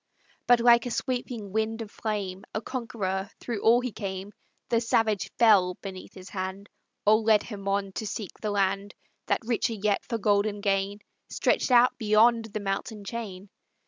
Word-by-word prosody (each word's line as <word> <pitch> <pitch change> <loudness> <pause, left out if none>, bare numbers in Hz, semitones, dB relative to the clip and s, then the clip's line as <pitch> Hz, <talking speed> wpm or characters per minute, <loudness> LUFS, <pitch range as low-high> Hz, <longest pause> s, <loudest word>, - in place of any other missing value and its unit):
But 245 -1 +6
like 235 0 +5
a - - -2
sweeping 240 -4 -3
wind 220 +2 -1
of 210 - -12
flame 200 -3 -4
A 215 - -1
conqueror 205 -6 -3
through 230 -4 -4
all 235 +2 +5
he 250 -1 -3
came; 195 -1 -5 0.4
The 230 -1 +2
savage 215 -4 +1
fell 195 -6 +5
beneath 190 -1 -9
his 185 0 -11
hand, 190 +1 -5 0.4
Or 215 +1 +6
led 220 -1 +3
him 200 -3 -8
on 195 0 0
to 215 +3 -4
seek 205 -2 -6
the 215 - -1
land 200 0 0 0.3
That 230 - 0
richer 235 0 0
yet 210 -1 0
for 230 - -3
golden 205 0 +1
gain 200 0 0 0.3
Stretched - - +1
out 245 0 +5
beyond 225 +1 +4
the 215 -1 -5
mountain 205 +2 -3
chain. 200 -3 -6
210 Hz, 170 wpm, -27 LUFS, 195-230 Hz, 0.4 s, But